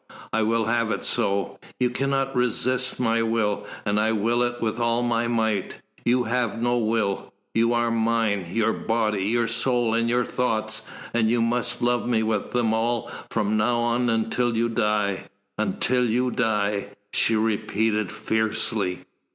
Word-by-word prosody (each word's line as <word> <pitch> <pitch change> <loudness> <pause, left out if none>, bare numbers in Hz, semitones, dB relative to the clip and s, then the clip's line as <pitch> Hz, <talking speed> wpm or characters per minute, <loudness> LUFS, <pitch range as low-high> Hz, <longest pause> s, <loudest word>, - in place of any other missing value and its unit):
I 110 - +2
will 115 +1 +1
have 115 0 +1
it - - -2
so. 100 0 0 0.2
You 125 -1 +2
cannot 135 +1 -1
resist 125 +1 +1
my 115 -2 +2
will, 115 -2 0 0.2
and 105 +1 +1
I 110 +1 +2
will 115 +3 +1
it 120 0 -1
with 110 +1 -2
all 115 0 +1
my 120 -1 +1
might. 110 -4 0 0.3
You 125 +1 +2
have 115 -1 -1
no 120 +1 +1
will 110 -3 -1 0.2
you 115 +1 +3
are 120 0 +1
mine, 110 -4 +1
your 115 +2 +1
body, 110 -3 0
your 115 +2 +1
soul, 120 0 +1
and 115 0 +1
your 120 0 +2
thoughts, 110 -3 -1 0.3
and 115 -2 +2
you 120 +1 +2
must 120 +1 0
love 120 0 +1
me 115 -2 +2
with 110 -2 -1
them 120 -3 +1
all 115 +1 -1 0.2
from 105 +1 0
now 120 +2 +1
until 120 0 0
you 115 +1 +1
die 105 -4 0 0.3
until 125 -1 +1
you 125 +3 +1
die," 105 -4 0 0.3
she 115 - +3
repeated 110 -1 0
fiercely. 110 -4 -1
115 Hz, 160 wpm, -24 LUFS, 110-120 Hz, 0.3 s, you